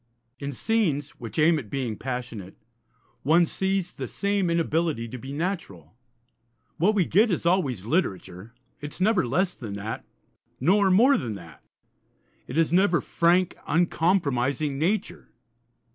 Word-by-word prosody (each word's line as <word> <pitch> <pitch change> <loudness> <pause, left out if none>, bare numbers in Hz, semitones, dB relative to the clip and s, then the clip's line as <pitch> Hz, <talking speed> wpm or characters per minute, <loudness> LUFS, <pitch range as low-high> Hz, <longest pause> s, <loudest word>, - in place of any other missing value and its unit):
In 140 0 -4
scenes 145 - 0
which 115 -3 -8
aim 160 +1 +4
at 115 -7 -10
being 125 -4 -2
passionate 120 -6 -6 0.6
one 165 +5 +4
sees 190 +1 -1
the - - -6
same 200 -3 0
inability 165 -6 0
to 125 +2 -8
be 135 +3 -8
natural. 140 - -4 0.8
What 205 +6 +3
we 190 -4 +3
get 210 +9 +3
is 175 -3 -1
always 140 - +1
literature; 100 - -2 0.3
it 145 0 -7
is - - -10
never 190 - +2
less 180 +8 +1
than 110 -5 -7
that, 100 +2 -5 0.6
nor 190 +8 +3
more 240 +9 +5
than 115 -5 -4
that. 85 -7 -13 0.8
It 130 - -5
is 165 0 +2
never 180 -1 +4
frank, 175 +2 +2
uncompromising 150 -5 +1
nature. 190 +8 -1
155 Hz, 140 wpm, -25 LUFS, 125-185 Hz, 0.8 s, more